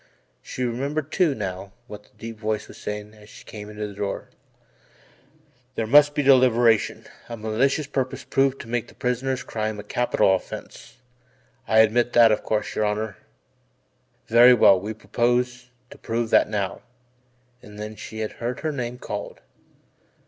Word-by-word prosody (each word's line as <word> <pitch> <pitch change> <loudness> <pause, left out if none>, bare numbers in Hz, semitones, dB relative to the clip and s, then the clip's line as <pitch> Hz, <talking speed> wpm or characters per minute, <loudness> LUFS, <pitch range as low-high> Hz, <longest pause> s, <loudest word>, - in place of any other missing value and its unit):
She 130 - -5
remembered, 140 +5 -2
too, 170 -7 +2
now, 95 -2 -5
what 105 -3 -11
the - - -26
deep 115 0 -8
voice 110 -1 -2
was - - -13
saying 105 0 -6
as 105 -1 -17
she - - -14
came 105 -1 -9
into 105 0 -5
the 105 - -7
door: 100 0 -4 1.5
"There 115 - -1
must 145 +5 +5
be 145 - +1
deliberation, 120 -4 +4 0.2
a 115 - -6
malicious 120 +7 0
purpose 135 -2 -3
proven 135 0 +1
to 115 - -10
make 120 0 -2
the - - -17
prisoner's 125 +1 -2
crime 110 -3 -3
a - - -7
capital 105 -3 +2
offence 95 - -7 0.7
I 110 +1 +6
admit 120 +2 +2
that, 115 -2 +7
of 105 - +1
course, 105 -1 -2
your 105 - 0
Honour. 105 -1 -2 1.1
Very 120 +2 +7
well, 100 -4 +6
we 105 +4 -5
propose 120 +2 -1 0.2
to - - -13
prove 115 0 -2
that - - +4
now," 100 -3 -3 0.8
and 105 0 -13
then 105 +1 -6
she 110 +1 -8
had 110 - -3
heard 120 +1 -5
her 155 - -1
name 125 -3 -4
called. 105 -4 -6
115 Hz, 165 wpm, -24 LUFS, 105-125 Hz, 1.5 s, that